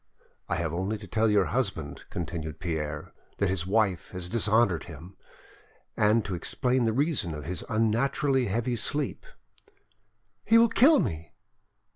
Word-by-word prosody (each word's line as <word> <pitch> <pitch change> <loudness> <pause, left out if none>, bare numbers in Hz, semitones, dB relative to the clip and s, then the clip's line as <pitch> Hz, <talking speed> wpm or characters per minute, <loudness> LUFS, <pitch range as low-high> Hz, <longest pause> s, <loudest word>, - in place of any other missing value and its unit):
"I - - +1
have 85 -1 -2
only 95 +5 -2
to 105 - -10
tell 110 +2 +1
your 105 -3 +3
husband," 85 - -2
continued 80 -3 -5
Pierre, 75 -4 -4 0.2
"that 100 - +1
his 90 -1 -2
wife 100 -3 +1
has 90 -1 -5
dishonoured 110 -5 +2
him, 85 +4 -11 0.8
and 105 +1 +3
to 95 - -4
explain 125 +8 0
the 115 - +2
reason 125 - 0
of 75 -2 -7
his 90 +1 -4
unnaturally 125 +4 +1
heavy 120 +4 -1
sleep." 145 +5 -3 1.2
"He 225 - +5
will 230 0 +6
kill 275 +6 +6
me!" 80 0 -3
100 Hz, 145 wpm, -27 LUFS, 85-120 Hz, 1.2 s, will